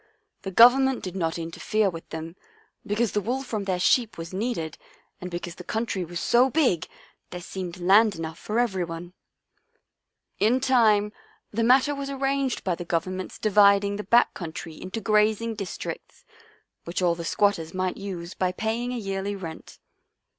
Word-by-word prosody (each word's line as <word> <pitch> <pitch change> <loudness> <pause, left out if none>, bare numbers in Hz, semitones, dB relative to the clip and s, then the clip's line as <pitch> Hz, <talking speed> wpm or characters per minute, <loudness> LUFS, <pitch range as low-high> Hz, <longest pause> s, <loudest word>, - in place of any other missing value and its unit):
The 195 - -5
Government 250 +6 +6
did 185 -1 -5
not 165 -3 -1
interfere 170 +6 -1
with 165 -3 -6
them, 160 +1 -6 0.5
because 215 +2 0
the 210 - 0
wool 250 +6 -2
from 215 -6 -4
their 185 -2 -1
sheep 230 +4 +2
was 165 +2 -7
needed 190 -7 -3 0.4
and 180 - -5
because 175 -1 -5
the 180 - -10
country 220 -1 -2
was 175 0 -5
so 245 +7 +4
big 255 - +1 0.4
there 180 - -6
seemed 180 0 -6
land 200 +4 +5
enough 160 0 -6
for 215 - -3
everyone. 175 -7 -2 1.3
In 230 +5 +3
time 220 -5 +3 0.4
the 225 - -1
matter 260 +5 +4
was 280 -1 -5
arranged 275 -1 -1
by 185 - 0
the 175 - -5
Govern 175 +2 -2
ment's 185 - -6
dividing 200 -1 +4
the 210 - -4
back 235 +5 +4
country 165 -1 -7
into 190 +5 -5
grazing 215 +2 +2
districts, 200 -4 -7 0.6
which 175 +2 -3
all 175 -1 +4
the 170 0 -6
squatters 170 -2 +1
might 185 -1 -1
use 185 -3 -6
by 185 -1 0
paying 225 +5 -2
a 250 - -3
yearly 195 -1 -3
rent." 165 -5 -9
200 Hz, 165 wpm, -25 LUFS, 175-230 Hz, 1.3 s, Government